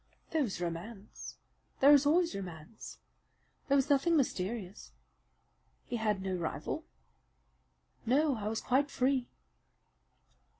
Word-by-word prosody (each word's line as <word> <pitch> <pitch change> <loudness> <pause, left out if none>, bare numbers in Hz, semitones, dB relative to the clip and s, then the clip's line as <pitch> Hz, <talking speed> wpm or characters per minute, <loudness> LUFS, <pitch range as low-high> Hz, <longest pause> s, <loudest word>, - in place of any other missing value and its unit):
"There 320 - +1
was 230 -11 -2
romance. 180 +5 -6 0.4
There 280 +2 +8
is 285 0 +5
always 335 +3 +3
romance. 185 +1 -8 0.7
There 280 - +3
was 275 0 +3
nothing 300 +4 +4
mysterious." 200 -6 -3 0.9
"He 240 - -3
had 210 -3 0
no 190 -1 -2
rival?" 170 -3 -4 1.2
"No, 280 +4 +2
I 210 -1 -4
was 220 +1 -2
quite 275 +3 +1
free." 260 -1 +1
235 Hz, 115 wpm, -32 LUFS, 195-280 Hz, 1.2 s, There